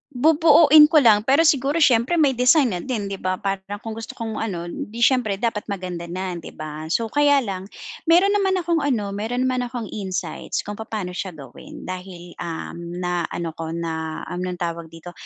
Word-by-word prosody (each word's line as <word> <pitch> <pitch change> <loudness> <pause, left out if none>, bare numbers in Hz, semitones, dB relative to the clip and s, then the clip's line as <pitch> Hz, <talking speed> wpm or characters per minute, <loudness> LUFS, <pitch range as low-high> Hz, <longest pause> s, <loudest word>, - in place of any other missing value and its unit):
Bubuoin 310 +1 +7
ko 305 -1 +4
lang 215 -3 +6
pero 280 +5 +5
siguro 295 +1 +3
siyempre 250 +3 +3
may 300 -5 +4
design 250 +1 +4
na 180 - -2
din 210 -4 -4
'di 195 - -5
ba 185 0 -1
para 195 0 -2 0.2
kung 225 - -5
gusto 225 0 -7
kong 225 -1 -5
ano 190 -6 -3
hindi 210 +6 -5
siyempre 240 -5 +3
dapat 210 0 -2
maganda 180 -4 -5
na 185 +2 -4
'di 170 -2 -8
ba, 155 0 -7
so 225 +7 -1
kaya 285 -1 +4
lang 195 -3 -5 0.4
meron 355 +5 +5
naman 390 -2 +2
akong 340 -2 0
ano, 240 -9 -1
meron 225 +5 -2
naman 255 -1 0
akong 240 -1 -5
insights 185 -5 -4
kung 205 +1 -7
papaano 215 -4 -4
siya 180 -1 -5
gawin 135 -5 -11
dahil, 180 -1 -8
um, 170 -1 -5 0.3
na 180 -1 -1
ano 170 -1 -4
ko 160 0 -7
na, 160 -1 -4
anong 180 0 -3
tawag 170 -1 -4
dito, 165 +2 -11
210 Hz, 190 wpm, -22 LUFS, 180-265 Hz, 0.4 s, Bubuoin